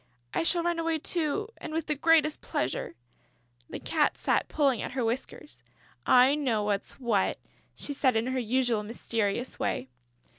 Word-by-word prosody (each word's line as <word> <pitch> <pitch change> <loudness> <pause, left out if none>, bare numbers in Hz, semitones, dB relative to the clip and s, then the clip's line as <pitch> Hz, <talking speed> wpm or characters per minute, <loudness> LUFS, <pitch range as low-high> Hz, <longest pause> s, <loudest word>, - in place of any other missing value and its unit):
I - - +1
shall 340 +1 +1
run 345 -1 0
away 330 -1 0
too... 335 +6 -2
and - - -7
with 320 -1 -1
the 300 - 0
greatest 310 0 +3
pleasure...." 125 - -2 0.7
The - - -5
Cat - - +1
sat - - +1
pulling 275 -6 +1
at - - -5
her 255 -3 0
whiskers: 250 +5 -4 0.5
"I 255 +2 +6
know 255 -8 0
what's 205 -1 -1
what," 230 -7 0 0.4
she 290 - -5
said, 265 -3 +2
in 225 +1 +1
her 260 0 -1
usual 240 -1 +1
mysterious 225 +1 -2
way. 130 - -2
260 Hz, 160 wpm, -28 LUFS, 225-305 Hz, 0.7 s, I